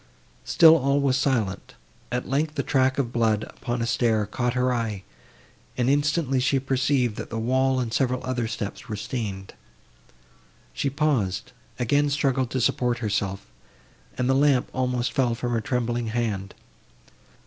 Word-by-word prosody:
Still 165 Hz, 0 st, +7 dB
all 140 Hz, 0 st, +1 dB
was 140 Hz, -2 st, +2 dB
silent. 130 Hz, -8 st, -1 dB, 0.4 s
At 125 Hz, 0 st, -2 dB
length 150 Hz, +3 st, -1 dB
a -, -, 0 dB
track 130 Hz, -2 st, +2 dB
of 125 Hz, -4 st, -1 dB
blood, 110 Hz, -2 st, +2 dB
upon 120 Hz, 0 st, -4 dB
a -, -, 0 dB
stair, 115 Hz, -2 st, +1 dB
caught 120 Hz, +4 st, -2 dB
her 125 Hz, 0 st, +2 dB
eye; 110 Hz, -5 st, -3 dB, 0.7 s
and 125 Hz, +1 st, +2 dB
instantly 145 Hz, -1 st, +1 dB
she 135 Hz, +2 st, +2 dB
perceived, 130 Hz, -3 st, 0 dB
that -, -, -6 dB
the 115 Hz, -, -4 dB
wall 130 Hz, +3 st, +1 dB
and 115 Hz, -3 st, -3 dB
several 125 Hz, -1 st, 0 dB
other 125 Hz, -3 st, -2 dB
steps 105 Hz, -1 st, -6 dB
were 110 Hz, -, -3 dB
stained. 100 Hz, -3 st, -5 dB, 1.2 s
She 140 Hz, -, -1 dB
paused, 135 Hz, -, 0 dB, 0.3 s
again 145 Hz, +4 st, +2 dB
struggled 135 Hz, -3 st, 0 dB
to 130 Hz, -, -1 dB
support 125 Hz, 0 st, +1 dB
herself, 100 Hz, -3 st, -2 dB, 0.7 s
and 125 Hz, 0 st, 0 dB
the 135 Hz, -, +3 dB
lamp 135 Hz, -2 st, +3 dB
almost 125 Hz, -1 st, -1 dB
fell 125 Hz, -4 st, +1 dB
from 120 Hz, 0 st, -3 dB
her 115 Hz, -1 st, 0 dB
trembling 120 Hz, +1 st, -1 dB
hand. 110 Hz, -4 st, -2 dB
125 Hz, 155 wpm, -25 LUFS, 115-135 Hz, 1.2 s, Still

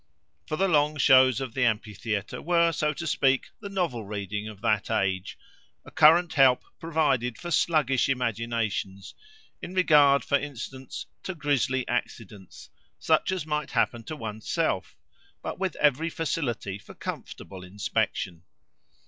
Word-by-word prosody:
For 155 Hz, -, -2 dB
the 195 Hz, +5 st, +2 dB
long 150 Hz, -2 st, +2 dB
shows 130 Hz, -4 st, +5 dB
of 130 Hz, -4 st, -5 dB
the 130 Hz, -, 0 dB
amphitheatre 105 Hz, -2 st, -2 dB
were, 170 Hz, 0 st, +3 dB
so 150 Hz, -1 st, 0 dB
to 170 Hz, -, -6 dB
speak, 135 Hz, -4 st, +1 dB
the 200 Hz, -, -7 dB
novel 175 Hz, -, -2 dB
reading 105 Hz, 0 st, -4 dB
of 105 Hz, -2 st, -10 dB
that 110 Hz, -3 st, +1 dB
age—a 95 Hz, -1 st, -4 dB
current 165 Hz, +2 st, +5 dB
help 130 Hz, -3 st, +5 dB, 0.2 s
provided 140 Hz, -8 st, 0 dB
for 175 Hz, -, -7 dB
sluggish 145 Hz, -5 st, +2 dB
imaginations, 115 Hz, -6 st, -2 dB, 0.5 s
in 180 Hz, -, -7 dB
regard, 145 Hz, -6 st, +5 dB
for 140 Hz, -, +2 dB
instance, 130 Hz, -2 st, -7 dB, 0.2 s
to 190 Hz, -, -5 dB
grisly 135 Hz, -4 st, 0 dB
accidents, 105 Hz, -5 st, -5 dB, 0.3 s
such 160 Hz, -, +1 dB
as 185 Hz, -5 st, -2 dB
might 150 Hz, -2 st, -2 dB
happen 120 Hz, -1 st, 0 dB
to 155 Hz, -, -5 dB
one's 110 Hz, -4 st, -7 dB
self; -, -, -1 dB, 0.5 s
but -, -, -5 dB
with 190 Hz, -1 st, -2 dB
every 150 Hz, +3 st, +2 dB
facility 120 Hz, -, -3 dB
for -, -, -14 dB
comfortable 95 Hz, -2 st, -7 dB
inspection. 90 Hz, -2 st, -2 dB
130 Hz, 140 wpm, -27 LUFS, 110-155 Hz, 0.5 s, shows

